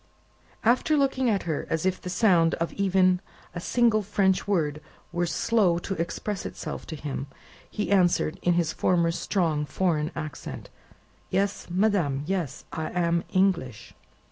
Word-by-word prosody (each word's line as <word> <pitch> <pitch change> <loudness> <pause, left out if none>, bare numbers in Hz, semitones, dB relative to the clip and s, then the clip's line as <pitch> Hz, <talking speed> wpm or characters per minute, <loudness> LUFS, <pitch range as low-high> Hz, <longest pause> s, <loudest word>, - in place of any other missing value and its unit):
After 255 +7 +3
looking 265 -3 +2
at 200 -4 +1
her, 160 -4 -3
as 165 +1 -1
if 185 -1 0
the 180 - -6
sound 175 -4 +3
of 170 0 -3
even 185 -2 +3 0.3
a 175 - -4
single 230 +3 +2
French 195 -2 +1
word 155 -7 0 0.3
were 175 0 0
slow 180 +2 +2
to 185 +3 -3
express 190 +3 -3
itself - - -6
to 160 - -5
him, 145 -2 -5 0.4
he 210 - -3
answered, 175 -4 +2
in 175 - +3
his 170 -2 +1
former 170 -2 +2
strong 165 -4 0
foreign 155 +1 0
accent. 155 -3 -7 0.6
"Yes, 195 +2 -1
madame, 175 -7 +1
yes. 180 -5 -3
I 160 -1 -3
am 170 -1 +1
English!" 185 - 0
180 Hz, 145 wpm, -26 LUFS, 165-200 Hz, 0.6 s, After